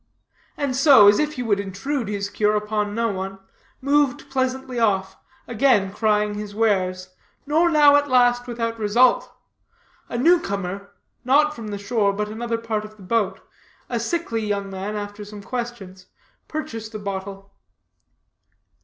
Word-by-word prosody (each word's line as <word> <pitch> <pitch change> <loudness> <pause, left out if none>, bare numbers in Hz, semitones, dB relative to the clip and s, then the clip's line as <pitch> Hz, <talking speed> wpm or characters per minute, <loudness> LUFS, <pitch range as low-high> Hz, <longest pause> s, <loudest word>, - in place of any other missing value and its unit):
And 280 -3 -1
so, 265 -6 +7
as 205 - +6
if 300 0 0
he 250 - -4
would 205 -4 +1
intrude 215 +6 -3
his 200 -1 -3
cure 210 +1 +1
upon 210 0 -2
no 230 0 0
one, 195 -1 -5 0.4
moved 280 -1 +1
pleasantly 260 -1 -2
off, 195 -4 +1 0.3
again 220 -5 +2
crying 210 -1 +1
his 205 -1 -7
wares, 185 -4 0 0.4
nor 320 +4 +3
now 295 -3 +6
at 290 0 +2
last 245 -1 +3
without 230 -1 -3
result. 235 +4 +3 0.8
A - - -3
new 340 +8 +5
comer, 200 - -4 0.3
not 295 +4 +3
from 225 -2 -8
the 205 -1 -4
shore, 200 0 0
but 210 +1 -3
another 230 +1 -3
part 225 -2 -3
of 215 0 -11
the 200 - -14
boat, 215 +1 -1 0.5
a 235 - -1
sickly 235 -3 -2
young 200 -2 -2
man, 195 +2 -5
after 205 0 -6
some 205 0 -10
questions, 200 -7 -6 0.4
purchased 225 -8 -6
a - - -1
bottle. 195 -1 -6
215 Hz, 155 wpm, -22 LUFS, 200-250 Hz, 0.8 s, so